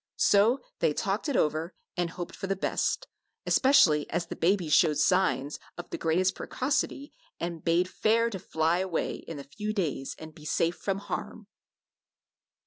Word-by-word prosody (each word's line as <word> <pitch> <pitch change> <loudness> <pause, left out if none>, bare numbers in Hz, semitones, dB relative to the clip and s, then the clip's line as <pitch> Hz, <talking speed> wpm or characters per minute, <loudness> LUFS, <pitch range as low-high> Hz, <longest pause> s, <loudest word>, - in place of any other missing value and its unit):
So 215 +6 +4 0.2
they - - +2
talked - - -1
it 280 - -1
over 160 +3 0 0.2
and 175 -1 0
hoped 175 +1 -7
for 195 - -5
the 195 - 0
best, 345 - -1 0.4
especially 170 - +4
as 175 - -1
the - - -6
babies 175 -3 +1
showed 155 -4 +5
signs 155 -3 +2 0.2
of 175 - -8
the - - -3
greatest 180 +4 +2
precocity 280 +1 -2 0.3
and 170 -1 -4
bade 170 +2 +2
fair 230 +4 +2
to 190 - -4
fly 160 +1 0
away 185 -3 -1
in 165 - -8
a 140 - -7
few 210 +10 -4
days 150 -9 -2
and 160 0 -10
be 155 - -15
safe 165 +3 0
from 195 -1 -2
harm. 200 - -5
175 Hz, 165 wpm, -28 LUFS, 160-200 Hz, 0.4 s, showed